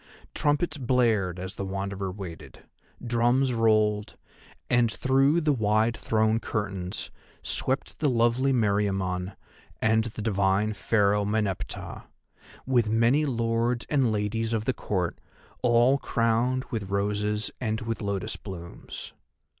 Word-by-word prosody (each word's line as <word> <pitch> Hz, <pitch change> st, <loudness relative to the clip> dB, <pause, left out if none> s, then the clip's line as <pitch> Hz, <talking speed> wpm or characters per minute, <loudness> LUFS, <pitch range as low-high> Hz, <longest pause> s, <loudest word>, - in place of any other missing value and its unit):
Trumpets 150 Hz, +1 st, 0 dB
blared 115 Hz, -8 st, +2 dB
as 95 Hz, +1 st, -5 dB
the -, -, -3 dB
Wanderer 95 Hz, 0 st, -3 dB
waited, 85 Hz, -8 st, -9 dB, 0.4 s
drums 120 Hz, +2 st, +2 dB
rolled, 110 Hz, -2 st, +2 dB, 0.5 s
and 120 Hz, -2 st, +3 dB
through 135 Hz, +6 st, +3 dB
the 150 Hz, -2 st, +2 dB
wide 110 Hz, 0 st, +2 dB
thrown 110 Hz, 0 st, +1 dB
curtains 100 Hz, -4 st, -4 dB, 0.3 s
swept 130 Hz, +2 st, -1 dB
the 150 Hz, -, +2 dB
lovely 120 Hz, +2 st, +2 dB
Meriamun 100 Hz, -5 st, 0 dB, 0.5 s
and 110 Hz, 0 st, +2 dB
the 110 Hz, -1 st, -6 dB
divine 100 Hz, 0 st, +1 dB
Pharaoh 105 Hz, -1 st, +2 dB
Meneptah, 105 Hz, -2 st, -3 dB, 0.6 s
with 120 Hz, -4 st, +2 dB
many 120 Hz, +7 st, +3 dB
lords 115 Hz, -1 st, 0 dB
and 135 Hz, -6 st, +3 dB
ladies 110 Hz, +2 st, -1 dB
of 110 Hz, -1 st, -1 dB
the 130 Hz, -, +1 dB
Court, 90 Hz, -8 st, -2 dB, 0.4 s
all 120 Hz, +3 st, +4 dB
crowned 120 Hz, +1 st, +1 dB
with 105 Hz, -5 st, -3 dB
roses 105 Hz, +1 st, -1 dB
and 110 Hz, -2 st, -1 dB
with 115 Hz, 0 st, -3 dB
lotus 100 Hz, +1 st, -2 dB
blooms. 85 Hz, -4 st, -9 dB
110 Hz, 120 wpm, -27 LUFS, 100-120 Hz, 0.6 s, all